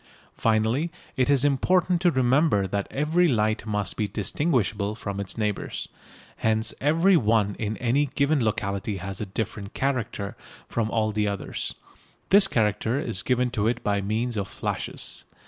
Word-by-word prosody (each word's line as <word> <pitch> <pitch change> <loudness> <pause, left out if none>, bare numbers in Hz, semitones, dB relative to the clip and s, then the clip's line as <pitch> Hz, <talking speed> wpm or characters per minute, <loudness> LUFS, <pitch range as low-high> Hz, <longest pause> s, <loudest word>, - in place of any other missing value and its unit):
Finally, 115 +8 +1 0.3
it 130 +1 +1
is 140 -1 +4
important 175 +5 +2
to 180 - +5
remember 130 - +3
that 100 +1 -2
every 160 +5 +2
light 110 -4 +1
must 105 -2 0
be 105 - -1
distinguishable 105 - 0
from 100 -2 -5
its 100 +2 -4
neighbours. 105 -2 -2 0.5
Hence 110 0 +1
every 165 +7 +4
one 110 - +2
in 110 0 -2
any 130 +4 +1
given 140 0 +1
locality 100 -2 -1
has 95 +2 -5
a 105 - -3
different 105 0 -5
"character" 120 -7 -2 0.3
from 110 -2 -1
all 110 -1 +1
the 105 0 0
others. 100 -1 -4 0.6
This 195 0 +7
character 110 - +1
is 115 -10 -2
given 125 +1 +1
to 105 -1 0
it 120 +1 -1
by 100 -1 +1
means 110 +4 -1
of 100 -2 -2
flashes. - - -4
110 Hz, 155 wpm, -25 LUFS, 105-135 Hz, 0.6 s, This